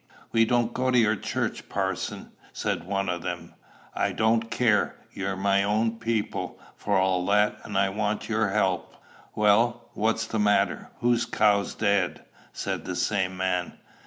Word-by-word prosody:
"We 115 Hz, -1 st, +4 dB
don't 120 Hz, 0 st, +1 dB
go 130 Hz, 0 st, 0 dB
to 125 Hz, -, +3 dB
your 110 Hz, -2 st, +4 dB
church, -, -, -3 dB
parson," -, -, -3 dB, 0.2 s
said -, -, -2 dB
one 100 Hz, -1 st, -1 dB
of 85 Hz, -1 st, -2 dB
them. -, -, -5 dB, 0.4 s
"I -, -, 0 dB
don't 115 Hz, +1 st, +2 dB
care; 115 Hz, -3 st, +2 dB, 0.2 s
you're 95 Hz, 0 st, -3 dB
my 100 Hz, +1 st, +2 dB
own 110 Hz, +3 st, 0 dB
people, 115 Hz, -2 st, -2 dB, 0.2 s
for 100 Hz, -1 st, 0 dB
all 95 Hz, -1 st, +2 dB
that, 105 Hz, +1 st, +3 dB
and 100 Hz, -, -4 dB
I 100 Hz, 0 st, +3 dB
want 105 Hz, +1 st, -2 dB
your 110 Hz, -2 st, +1 dB
help." 95 Hz, -3 st, 0 dB, 0.4 s
"Well, 115 Hz, +3 st, +2 dB
what's 115 Hz, +1 st, 0 dB
the 110 Hz, -1 st, -3 dB
matter? 105 Hz, -1 st, +2 dB
Who's 120 Hz, -1 st, +2 dB
cow's 100 Hz, -2 st, +2 dB
dead?" 100 Hz, -3 st, 0 dB, 0.3 s
said -, -, -4 dB
the 90 Hz, -, -3 dB
same 95 Hz, 0 st, 0 dB
man. 90 Hz, -1 st, -1 dB
105 Hz, 160 wpm, -26 LUFS, 95-115 Hz, 0.4 s, We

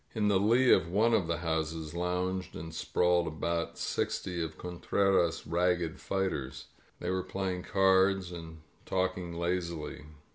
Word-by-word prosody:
In 105 Hz, -2 st, +2 dB
the 100 Hz, -2 st, +4 dB
lee 120 Hz, +5 st, +4 dB
of 85 Hz, -, +2 dB
one 110 Hz, +6 st, +3 dB
of 95 Hz, -6 st, +2 dB
the 85 Hz, -, 0 dB
houses 80 Hz, -1 st, -2 dB
lounged 90 Hz, +2 st, -2 dB
and 80 Hz, +1 st, -7 dB
sprawled 90 Hz, +1 st, +2 dB
about 85 Hz, +2 st, -2 dB
sixty 90 Hz, -2 st, -2 dB
of 80 Hz, -1 st, -4 dB
Contreras' 90 Hz, 0 st, +1 dB
ragged 90 Hz, -1 st, 0 dB
fighters. 70 Hz, -9 st, -2 dB, 0.3 s
They -, -, -2 dB
were 95 Hz, 0 st, 0 dB
playing 95 Hz, 0 st, -3 dB
cards 95 Hz, 0 st, +3 dB
and 80 Hz, -2 st, -9 dB, 0.3 s
talking 95 Hz, -2 st, -1 dB
lazily. 85 Hz, -3 st, -3 dB
90 Hz, 140 wpm, -31 LUFS, 85-95 Hz, 0.3 s, the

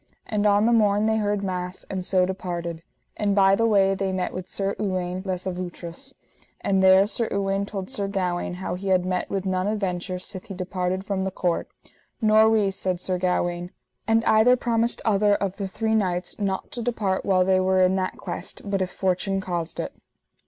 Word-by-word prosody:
And 210 Hz, -1 st, +1 dB
on 205 Hz, +1 st, +4 dB
the 235 Hz, -, +4 dB
morn 210 Hz, -2 st, +3 dB
they 220 Hz, 0 st, +2 dB
heard 205 Hz, -1 st, 0 dB
mass, 180 Hz, -1 st, -3 dB
and 190 Hz, -1 st, -4 dB
so 185 Hz, 0 st, +2 dB
departed. 175 Hz, -3 st, -4 dB, 0.4 s
And 205 Hz, -2 st, +1 dB
by 195 Hz, -1 st, +5 dB
the 230 Hz, +3 st, +3 dB
way 195 Hz, -3 st, +4 dB
they 195 Hz, 0 st, -1 dB
met 185 Hz, -1 st, -2 dB
with 185 Hz, -1 st, -6 dB
Sir 195 Hz, 0 st, -2 dB
Uwaine 185 Hz, -2 st, -2 dB
les 185 Hz, -1 st, -2 dB
Avoutres, 180 Hz, +7 st, -5 dB, 0.4 s
and 195 Hz, -1 st, +1 dB
there 190 Hz, +1 st, +7 dB
Sir 220 Hz, +2 st, -1 dB
Uwaine 195 Hz, 0 st, 0 dB
told 195 Hz, -3 st, -5 dB
Sir 200 Hz, 0 st, -2 dB
Gawaine 180 Hz, -3 st, -2 dB
how 180 Hz, -1 st, -4 dB
he 190 Hz, +2 st, -5 dB
had 185 Hz, -1 st, +3 dB
met 185 Hz, -1 st, -1 dB
with 195 Hz, -1 st, -2 dB
none 185 Hz, 0 st, 0 dB
adventure 185 Hz, -3 st, -2 dB
sith 185 Hz, +1 st, -8 dB
he 195 Hz, -, -6 dB
departed 185 Hz, +1 st, -2 dB
from 195 Hz, -2 st, -1 dB
the 190 Hz, -, 0 dB
court. 180 Hz, -2 st, -1 dB, 0.5 s
Nor 220 Hz, 0 st, +5 dB
we, 210 Hz, -3 st, +3 dB
said 185 Hz, -2 st, -2 dB
Sir 185 Hz, 0 st, -1 dB
Gawaine. 175 Hz, -1 st, 0 dB, 0.4 s
And 225 Hz, 0 st, +3 dB
either 220 Hz, +3 st, +5 dB
promised 235 Hz, -1 st, 0 dB
other 205 Hz, -1 st, +3 dB
of 195 Hz, -1 st, -2 dB
the 195 Hz, -, -3 dB
three 220 Hz, +4 st, -1 dB
knights 180 Hz, -4 st, 0 dB
not 195 Hz, +3 st, -2 dB
to 245 Hz, -5 st, -4 dB
depart 215 Hz, -5 st, -1 dB
while 185 Hz, -2 st, +3 dB
they 190 Hz, 0 st, +3 dB
were 185 Hz, 0 st, +3 dB
in 185 Hz, +1 st, +3 dB
that 185 Hz, -1 st, -2 dB
quest, -, -, -6 dB
but 200 Hz, -1 st, 0 dB
if 185 Hz, -, 0 dB
fortune 190 Hz, +1 st, 0 dB
caused 175 Hz, -3 st, -3 dB
it. -, -, -3 dB
190 Hz, 200 wpm, -24 LUFS, 185-205 Hz, 0.5 s, there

